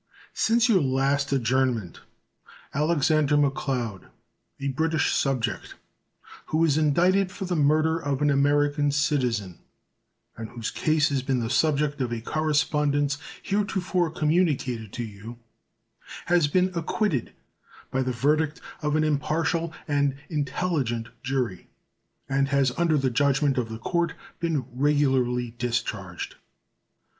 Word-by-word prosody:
Since 230 +2 +3
your 205 -7 +4
last 140 +1 +1
adjournment 125 - 0 0.7
Alexander 150 -1 +2
McLeod, 130 -8 -1 0.5
a 140 0 -2
British 160 +4 +1
subject 125 -5 -1 0.7
who 155 - -1
was 160 -3 +3
indicted 180 +6 +3
for 195 - -5
the 180 -1 -1
murder 155 +2 +3
of 140 -3 -1
an 145 - +4
American 145 +1 +2
citizen, 125 - 0 0.8
and 110 -1 -7
whose 115 -2 -5
case 155 -1 +2
has 140 -2 0
been 130 0 0
the 115 0 -2
subject 150 -1 +1
of 125 -2 -1
a 120 - -2
correspondence 145 0 0 0.2
heretofore 190 -3 0
communicated 150 - 0
to 120 - -3
you, 110 +2 -9 0.9
has 175 -4 +3
been 185 +5 +2
acquitted 170 - -1 0.6
by 130 - 0
the 130 0 -1
verdict 150 +5 +1 0.2
of 150 -1 0
an 155 - +2
impartial 155 +3 0 0.2
and 145 -2 +1 0.2
intelligent 140 -6 -1
jury, 130 -8 -2 0.6
and 135 0 +1
has 140 -2 +2
under 165 -2 +2
the 135 -2 +1
judgment 140 +1 +2
of 115 -2 -2
the 110 - -5
court 170 +8 -1 0.2
been 160 -6 -1
regularly 130 -3 +1
discharged. 120 -1 -3
145 Hz, 125 wpm, -26 LUFS, 130-155 Hz, 0.9 s, your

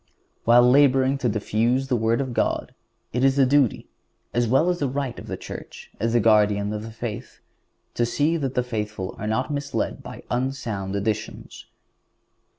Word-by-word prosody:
While 120 +1 +6
laboring 135 0 +4
to 125 - +1
diffuse 115 +5 0
the 130 - +1
Word 115 +2 +1
of 130 -3 -4
God - - -1 0.4
it 125 +2 0
is 135 0 +4
the 140 -1 +5
duty, 135 -3 +2 0.5
as 120 0 +1
well 135 +8 +3
as 175 - -3
the 140 - 0
right 135 -2 -3
of - - -10
the - - -4
Church, - - -10
as 115 +2 0
the 120 - +4
guardian 105 -2 +3
of 110 +1 -6
faith, 115 -2 -6 0.5
to 120 - 0
see 145 +7 +1
that 135 -5 -2
the 125 - +2
faithful 105 -5 -4
are 105 - -4
not 125 +7 -1
misled 145 0 -3
by - - -10
unsound 120 -6 -2
editions. 105 +1 -4
120 Hz, 170 wpm, -24 LUFS, 110-135 Hz, 0.5 s, While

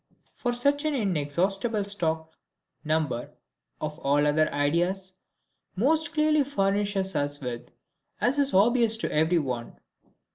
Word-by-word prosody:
For 245 -1 -2
such 280 +4 +1
an 305 -1 0
inexhaustible 195 - 0
stock, 160 -5 0 0.5
number 155 -6 -1 0.5
(of 155 +1 -5
all 145 +1 +2
other 155 +1 +2
our 145 - -3
ideas) 180 +6 0 0.6
most 310 - +1
clearly 305 -1 +3
furnishes 195 - 0
us 145 0 -1
with, 125 -3 -6 0.5
as 265 +4 +1
is 280 -1 +3
obvious 225 +3 +3
to 225 - -3
every 160 +3 +2
one. 125 -6 -3
190 Hz, 130 wpm, -26 LUFS, 150-240 Hz, 0.6 s, clearly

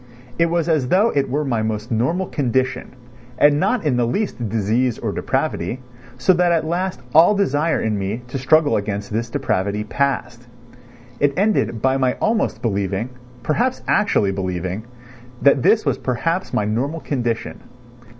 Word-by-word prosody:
It 170 - +4
was 170 -1 0
as 155 -6 +1
though 200 - +3
it 140 -2 0
were 145 +3 -1
my 120 -5 0
most 110 +2 -3
normal 135 +12 0
condition, 130 -4 -1 0.4
and 145 +1 +4
not 200 +2 0
in 135 -5 +2
the 120 -1 +1
least 120 - -2
disease 115 +4 0
or - - -3
depravity, 90 +10 -2 0.4
so 130 +9 +4
that 175 0 +2
at 165 -2 +1
last 175 -2 -2
all 170 +6 +6
desire 165 -5 +1
in 110 -2 -1
me 100 +5 -3
to 135 - -4
struggle 150 +4 +3
against 100 0 -3
this 115 +2 -2
depravity 105 -6 -1
passed. 125 -1 -2 0.7
It 140 0 +1
ended 195 - +1
by 130 0 +3
my 130 -2 +1
almost 220 -1 -1
believing 100 +1 -1 0.3
(perhaps 240 - 0
actually 105 - +2
believing) 95 +2 -3 0.5
that 140 -1 +4
this 220 - +3
was - - 0
perhaps 165 +8 -2
my 105 - 0
normal 135 +10 -2
condition. 120 -5 -3
130 Hz, 160 wpm, -20 LUFS, 110-160 Hz, 0.7 s, all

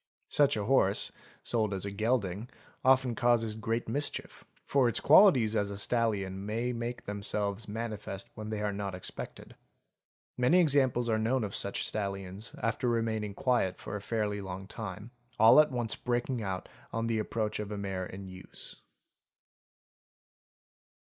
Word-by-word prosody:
Such 145 -6 +3
a 105 - -2
horse, 105 -5 +3 0.3
sold 110 -4 0
as 95 - -3
a 100 - -3
gelding, 110 0 -1 0.3
often 130 -1 +4
causes 115 -1 +2
great 115 +2 -2
mischief, 145 +6 -2 0.2
for 135 -3 +3
its - - +1
qualities 125 - +6
as 100 -2 +1
a 100 - -5
stallion 100 -4 0
may 115 +4 -1
make 120 +1 -4
them 100 0 -4
selves 100 +1 0
manifest 105 -3 -5
when 110 0 -7
they 105 -1 -3
are 105 -1 0
not 100 -1 -4
expected. 90 - -7 0.9
Many 145 +9 +5
examples 135 -7 +3
are 110 -1 +2
known 115 +3 +1
of 100 -1 -4
such 100 - 0
stallions, 100 +1 -4
after 120 +3 0
remaining 110 -3 -1
quiet 120 -8 +1
for - - -6
a 105 - -4
fairly 105 -1 -1
long 95 0 -6
time, 105 +1 -7 0.3
all 115 +6 +8
at 155 0 +6
once 120 -4 0
breaking 120 0 -1
out 95 -3 -3 0.2
on 115 0 -1
the 115 -1 0
approach 110 0 -2
of 105 -1 -4
a 105 - -3
mare 95 -2 -3
in 95 +1 -8
use. 95 0 -9
110 Hz, 155 wpm, -31 LUFS, 100-120 Hz, 0.9 s, all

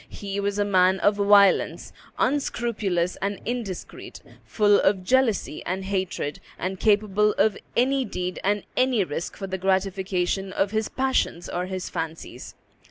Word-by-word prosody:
He 200 0 -5
was 200 0 -1
a 205 - +1
man 190 -1 +3
of 205 0 +3
violence, 200 -1 +4 0.2
unscrupulous 215 -10 0
and 200 +1 -3
indiscreet, 225 -6 -5 0.3
full 205 -2 +4
of 190 -1 +2
jealousy 235 -7 +1
and 190 +2 -3
hatred, 190 -6 -2 0.2
and 185 0 -4
capable 210 -1 +3
of 215 -2 +3 0.2
any 265 +2 +2
deed 180 -5 -4
and 205 +1 +1
any 255 -5 +2
risk 170 -1 -5
for 195 - -5
the 190 0 -4
gratification 190 0 -1
of 195 0 0
his 220 0 -1
passions 260 -10 -1
or 180 +1 -3
his 185 -1 -4
fancies. 160 0 -6
200 Hz, 145 wpm, -25 LUFS, 185-210 Hz, 0.3 s, violence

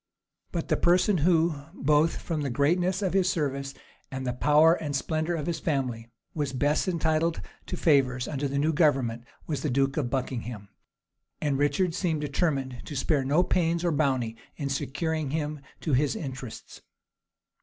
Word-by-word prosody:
But 170 -2 -3
the - - +2
person 180 +2 +3
who, 165 +1 +3 0.2
both 150 +2 +2
from 160 -3 -2
the 140 - -1
greatness 175 +9 +1
of 185 - 0
his 190 -2 +3
services 140 -4 -2 0.3
and 130 -1 -5
the 125 - -1
power 150 +5 +5
and 150 -4 -3
splendor 155 +5 -1
of 150 -3 -3
his 165 -2 -2
family, 125 -7 -2 0.2
was 145 -4 -2
best 145 +6 +1
entitled 165 -1 +1 0.3
to 180 - -4
favors 130 -6 +2
under 140 -1 -2
the 140 +1 -2
new 155 +3 +2
government, 130 -7 +2 0.2
was 150 -3 -3
the 150 - -1
duke 135 +2 +1
of 135 -6 0
Buckingham; 120 -5 -4 0.7
and 145 -3 0
Richard 165 +5 +1
seemed 160 -4 -1
determined 140 -4 -1
to 150 - -7
spare 140 +1 +1
no 145 +7 +3
pains 170 -1 +1
or 170 - +2
bounty 130 -7 0 0.2
in 140 -2 -3
securing 155 +3 -2
him 150 0 -2 0.2
to 155 - -1
his 140 +2 +2
interests. 130 -5 -7
150 Hz, 165 wpm, -27 LUFS, 135-165 Hz, 0.7 s, power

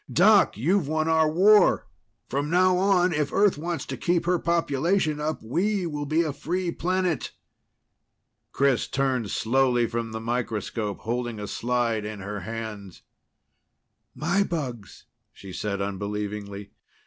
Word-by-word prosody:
Doc, - - +5
you've 165 - +1
won 155 +1 0
our 160 -1 +3
war! 200 +6 +5 0.4
From 145 +2 -2
now 185 +2 +4
on, 185 -1 +3
if 150 -1 -1
Earth 200 -1 +3
wants 165 +2 -4
to - - -5
keep 175 -1 0
her 180 0 +2
population 165 0 +1
up, 155 -3 -3
we'll 165 - -1
be 160 +3 +2
a 155 -3 -3
free 175 +4 -2
planet!" 180 -3 -1 1.2
Chris 135 -3 +1
turned 130 -5 -1
slowly 120 +2 +2
from 115 -1 -3
the 110 - -4
microscope, 115 -3 -3
holding 120 -1 -3
a 105 - -4
slide 120 -1 -1
in 105 0 -6
her 100 +2 -5
hands. 105 -1 -7 1.1
"My 175 +6 +1
bugs," 130 - -4 0.3
she 95 -2 -11
said 100 0 -2
unbelievingly. 100 0 -5
135 Hz, 135 wpm, -25 LUFS, 110-170 Hz, 1.2 s, Doc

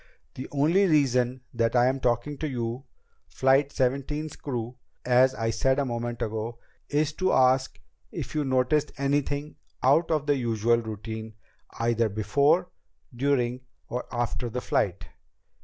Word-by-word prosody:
The 130 - -7
only 165 +8 +3
reason 130 -5 +2
that 115 0 0
I 120 0 +5
am 130 +1 +1
talking 125 +4 0
to 155 - -2
you, 120 +1 -4 0.4
Flight 135 +2 +2
Seventeen's 140 +4 -1
crew, 120 -3 -5 0.3
as 130 +1 +4
I 115 0 -1
said 130 +4 +1
a 140 - +1
moment 120 -1 -3
ago, 110 +1 -4 0.3
is 150 +1 +1
to 185 - +3
ask 130 0 +3 0.3
if - - -6
you 155 -1 0
noticed 135 +3 +1
anything 145 +1 -1 0.3
out 145 +6 +4
of 155 -3 0
the 145 -1 +3
usual 115 -1 +2
routine 110 0 -6 0.4
either 115 -1 +1
before, 140 - +2 0.4
during, 125 -1 0 0.3
or 125 +1 -3
after 120 0 -2
the 125 +2 -3
flight." - - -1
130 Hz, 140 wpm, -27 LUFS, 120-145 Hz, 0.4 s, I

